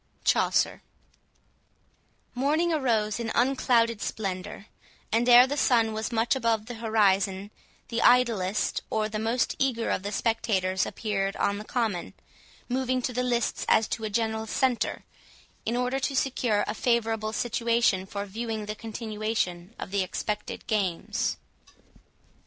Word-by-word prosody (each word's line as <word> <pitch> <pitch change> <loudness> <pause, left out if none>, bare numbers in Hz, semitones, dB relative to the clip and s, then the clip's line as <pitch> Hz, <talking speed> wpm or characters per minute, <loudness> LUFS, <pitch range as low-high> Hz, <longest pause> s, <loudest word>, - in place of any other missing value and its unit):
CHAUCER - - +2 1.5
Morning 305 +7 +1
arose 230 -7 +1
in 225 -1 -3
unclouded 235 -3 +2
splendour, 195 0 -4 0.5
and 235 +3 +2
ere 245 +1 +9
the 280 +2 -2
sun 230 -6 +3
was 220 +3 -3
much 230 +3 +2
above 230 -4 0
the 245 - -7
horizon, 200 -3 +1 0.4
the 230 -1 -1
idlest 220 -5 +3
or 215 -1 0
the 215 0 -4
most 230 +3 0
eager 245 -4 0
of - - 0
the 200 +1 -4
spectators 195 -4 0
appeared 195 -3 -2
on 200 0 0
the - - -6
common, 215 -6 -2 0.5
moving 255 0 0
to 250 - -2
the 250 - 0
lists 240 -2 0
as 220 - +4
to 225 - -3
a 215 - -2
general 220 +1 -1
centre, 255 +1 0 0.6
in 230 - 0
order 250 +2 0
to 270 +1 -2
secure 245 -5 +1
a - - -3
favourable 225 -2 0
situation 235 -4 +1
for 200 +1 -4
viewing 220 +1 -4
the 210 - -4
continuation 215 -4 -3
of - - -7
the 200 -1 +1
expected 210 +3 -4
games. 200 -6 -1
225 Hz, 140 wpm, -27 LUFS, 210-240 Hz, 1.5 s, ere